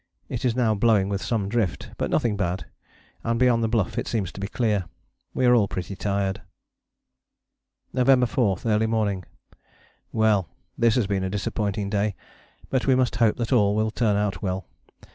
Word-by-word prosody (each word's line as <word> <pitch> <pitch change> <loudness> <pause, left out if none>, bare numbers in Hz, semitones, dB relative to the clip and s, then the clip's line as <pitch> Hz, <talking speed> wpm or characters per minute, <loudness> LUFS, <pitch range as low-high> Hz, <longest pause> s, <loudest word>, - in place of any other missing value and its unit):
It 125 - -4
is 120 -2 +1
now 120 -4 +2
blowing 105 -2 +3
with 100 -1 -2
some 110 -5 -1
drift, 105 -4 -2
but - - -2
nothing 115 -3 +1
bad, 90 -1 -2 0.6
and 115 0 0
beyond 125 -2 +3
the - - +2
Bluff 110 -5 0
it - - -4
seems 100 -6 -2
to - - -10
be 100 - -3
clear. 105 -4 0 0.5
We 130 - +2
are 125 - +6
all 110 -5 +4
pretty 95 +1 -5
tired. 100 -1 -1 1.5
November 125 0 +4
4. 110 -5 +1
Early 110 0 +2
morning. 105 -5 -1 0.9
Well! 110 -5 +2 0.3
this 115 -2 +3
has 125 - +2
been 95 -1 -1
a 95 - -1
disappointing 100 0 -2
day, 105 -1 0 0.6
but 130 0 0
we 130 - +5
must 130 -2 +1
hope 115 -2 +3
that 120 +1 -1
all 105 -4 +3
will 110 0 +1
turn 110 -2 +1
out 105 -1 -1
well. 95 -2 -2
105 Hz, 180 wpm, -25 LUFS, 100-115 Hz, 1.5 s, are